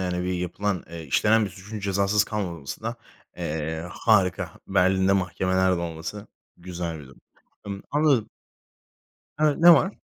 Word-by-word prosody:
yani, 90 -1 -2
bir 90 - -1
yapılan, 90 +2 -2
eee, 85 -1 -7
işlenen 105 +10 +3
bir 100 - -4
suçun 105 +4 -9
cezasız 100 +1 +2
kalmaması 85 -8 -5
da, 115 +2 -3 0.4
eee, 80 +2 -3
harika. 95 -5 +2 0.2
Berlin'de 95 +1 +3
mahkemeler 95 0 +1
de - - -3
olması 85 +5 -6 0.3
güzel 85 -2 -5
bir 70 - -11
durum. 65 - -18 0.5
Imm, 100 -1 -5
anladım. 145 -7 +2 1.1
Evet, 150 -1 +2
ne 175 +1 +10
var? 190 +4 +1
95 Hz, 145 wpm, -25 LUFS, 85-105 Hz, 1.1 s, ne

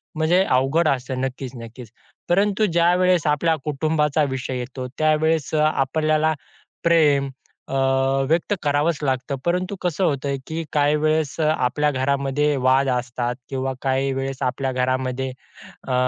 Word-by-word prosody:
म्हणजे 165 +4 +3
अवघड 135 +4 +2
असते. 130 -1 -1
नक्कीच, 130 0 -4
नक्कीच. 115 0 -10 0.4
परंतु 205 +3 +2
ज्यावेळेस 175 -1 +3
आपल्या 160 +2 +2
कुटुंबाचा 150 0 +1
विषय 130 0 -3
येतो, 125 +1 -5
त्यावेळेस 155 -1 +1
अ, 150 - +3
आपल्याला 155 +2 +1 0.5
प्रेम 150 -5 +3 0.4
अ, - - -5 0.6
व्यक्त 170 +5 +1
करावंच 145 +2 +1
लागतं. 130 +1 -1
परंतु 180 +3 0
कसं 180 +1 -1
होतय, 140 -3 0
की 160 +1 -3
काही 145 0 +3
वेळेस 155 -1 0
अ, 155 - +2
आपल्या 150 +4 +1
घरामध्ये 140 +2 0
वाद 135 +1 +4
असतात 125 -1 -2
किंवा 135 0 -2
काही 135 0 0
वेळेस 135 0 -4
आपल्या 130 +1 -1
घरामध्ये, 130 +1 -1 0.6
अ, 130 - -1
145 Hz, 135 wpm, -22 LUFS, 130-160 Hz, 0.6 s, वाद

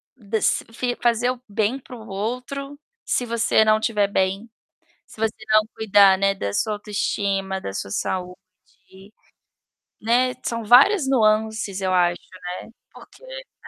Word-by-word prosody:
desa 220 -2 -1
fi 245 0 -2
fazer 240 +1 +2
o 250 -1 -8
bem 215 +5 -1
para 250 - -12
o 225 -1 -12
outro 250 +8 -5 0.3
se 245 - 0
você 230 -1 +2
não 215 0 +3
tiver 210 -3 +1
bem, 195 +3 -1 0.6
se - - -16
você 220 -1 0 0.2
não 215 0 +6
cuidar, 200 -3 +5
né, 195 0 +1
da 100 - -4
sua 215 - 0
autoestima, 200 -2 -2
da 95 - -6
sua 95 - -5
saúde, 185 - -7 0.9
né. 250 +3 +2
São 230 -1 -3
várias 270 - +6
nuances, 220 -4 +1
eu 185 -1 -1
acho, 175 -1 +2
né. 185 - -12 0.6
Porque - - -16
É. - - -10
215 Hz, 145 wpm, -22 LUFS, 195-240 Hz, 0.9 s, não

